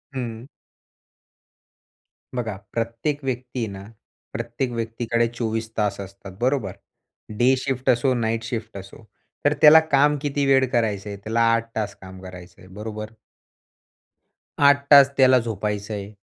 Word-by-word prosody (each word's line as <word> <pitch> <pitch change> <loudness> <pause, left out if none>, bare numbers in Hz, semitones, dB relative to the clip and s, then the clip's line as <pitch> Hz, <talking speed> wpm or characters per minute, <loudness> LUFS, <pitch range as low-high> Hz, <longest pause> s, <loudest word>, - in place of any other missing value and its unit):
हं. 120 0 -5 1.9
बघा, 110 -5 -3 0.2
प्रत्येक 115 +6 -2
व्यक्ती 125 -1 -4
आहे 115 - -1
ना, 95 0 -9 0.5
प्रत्येक 120 +2 -3
व्यक्तीकडे 115 0 -1
24 110 -1 -2
तास 105 -2 0
असतात, 100 0 -10
बरोबर. 130 -2 0 0.7
डे 130 +2 +4
शिफ्ट 130 -1 -2
असो, 125 +2 +3
नाईट 115 -1 -1
शिफ्ट 115 -2 -5
असो. 100 +4 -12 0.4
तर 145 - +4
त्याला 155 +1 +9
काम 145 +1 +4
किती 145 -1 -1
वेळ 135 -1 +4
करायचं 105 -4 -1
आहे, 100 - -6
त्याला 110 +4 -2
8 115 0 0
तास 105 -3 -3
काम 95 0 -11
करायचं 90 -1 -12
आहे, 90 - -15
बरोबर? 110 0 -6 1.6
8 140 0 +4
तास 140 -1 +9
त्याला 130 -1 +6
झोपायचं 105 -2 -4
आहे. 100 0 -6
115 Hz, 135 wpm, -23 LUFS, 105-130 Hz, 1.9 s, त्याला